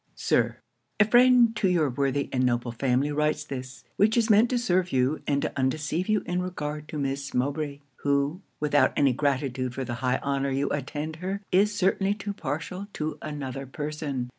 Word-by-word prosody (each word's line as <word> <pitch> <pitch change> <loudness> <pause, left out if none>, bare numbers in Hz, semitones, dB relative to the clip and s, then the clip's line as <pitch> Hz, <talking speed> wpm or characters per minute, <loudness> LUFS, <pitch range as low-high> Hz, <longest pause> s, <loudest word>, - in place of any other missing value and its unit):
'Sir, - - +1 0.4
'A 210 - +7
friend 240 0 +5
to 210 -3 +2
your 170 -4 +3
worthy 140 +2 0
and 130 -1 +2
noble 120 -1 0
family 130 +4 +1
writes 150 +1 0
this; 130 -3 -7
which 215 +3 +3
is 230 -1 +3
meant 215 +3 +5
to 250 - +1
serve 185 -6 +1
you, 130 +3 +1
and 140 -1 +1
to - - -1
undeceive 150 +7 -1
you 215 -1 +2
in 180 0 -1
regard 150 -4 -4
to 155 - -6
Miss 140 0 -3
Mowbray 140 +2 -1 0.2
who, 140 +5 0 0.2
without 150 -1 +3
any 140 -3 +4
gratitude 130 -2 -1
for 135 - -2
the 120 - -4
high 125 -1 +2
honour 140 0 0
you 135 +1 0
intend 150 +2 -3
her, 190 +4 -4
is 205 +3 +3
certainly 195 +1 +2
too 205 -1 -5
partial 165 +5 -4
to 155 0 -4
another 135 -3 -5
person. 145 -3 -4
150 Hz, 185 wpm, -27 LUFS, 135-185 Hz, 0.4 s, A